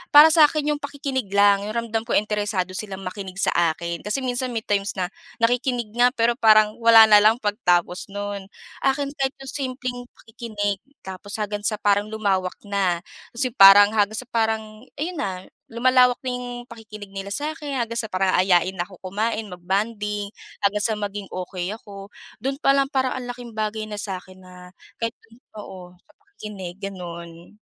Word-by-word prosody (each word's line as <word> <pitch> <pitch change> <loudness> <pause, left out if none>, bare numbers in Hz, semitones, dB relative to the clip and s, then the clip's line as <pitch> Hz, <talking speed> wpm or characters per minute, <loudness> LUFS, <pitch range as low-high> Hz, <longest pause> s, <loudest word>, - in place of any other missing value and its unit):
Para 300 +2 +11
sa 315 -2 +8
akin 300 -1 -1
'yong - - -8
pakikinig 275 -4 -3
lang, 200 0 +4
'yong 215 - -5
ramdam 230 -1 -2
ko - - 0
interesado 210 -3 0
silang 195 -1 -6
makinig 185 0 -6
sa - - +2 0.2
akin, 170 +1 -5
kasi 235 +6 -2
minsan 250 0 -2
may 225 - -2
times 200 -2 -1
na, 185 -2 -1 0.4
nakikinig 245 -1 +1
nga 245 +1 +6
pero 235 0 +2
parang 215 -1 +5
wala 230 -1 +8
na 210 -1 +8
lang 215 +1 +6
pagtapos 180 -4 +1
no'n. 205 -1 -5 0.4
Akin, 275 +1 +1
kahit 270 -1 0
'yong 265 - -6 0.2
simpleng 250 -2 -4 0.2
pakikinig, 215 -4 -3 0.2
tapos 190 +2 -8
hanggang 205 -1 -3
sa 215 - 0
parang 205 0 +2
lumawak 195 -4 0
na. 190 -4 0 0.3
Ta's 235 - 0
yung 250 - -11
parang, 200 +1 +9
hanggang 210 0 +1
sa 255 - -5
parang 220 0 -2
ayon 340 +4 -3
na, 185 -4 -4 0.3
lumalawak 250 +1 +4
na 255 - -1
yung 245 -1 -6
pakikinig 215 -3 -11
nila 195 0 -6
sa 300 +6 -3
akin. 290 -4 -5
Hanggang 230 0 -3
sa 220 - -7
parang 185 0 +1
aayain 185 0 +3
na 175 - -2
ako 190 - -14
kumain, 220 +2 -1
mag-bonding 205 +3 -2 0.4
hanggang 205 +1 +1
sa 220 -1 +1
maging 205 -1 -5
okey 180 0 -4
ako. 200 -2 -11 0.3
Do'n 270 +3 -2
pa 275 - +4
lang 275 -1 +2
parang 260 -3 +1
ang 250 -1 -6
laking 245 -1 -8
bagay 215 0 -2
na 210 - -5
sa 195 -3 -4
akin 185 0 -17
na 185 0 -15 0.5
kahit 230 0 -1
do'n 225 +1 -20 0.2
oo, 180 -3 -11
sa 245 - -28
pakikinig, 210 - -9
gano'n. 170 -1 -8
210 Hz, 180 wpm, -23 LUFS, 195-245 Hz, 0.5 s, Para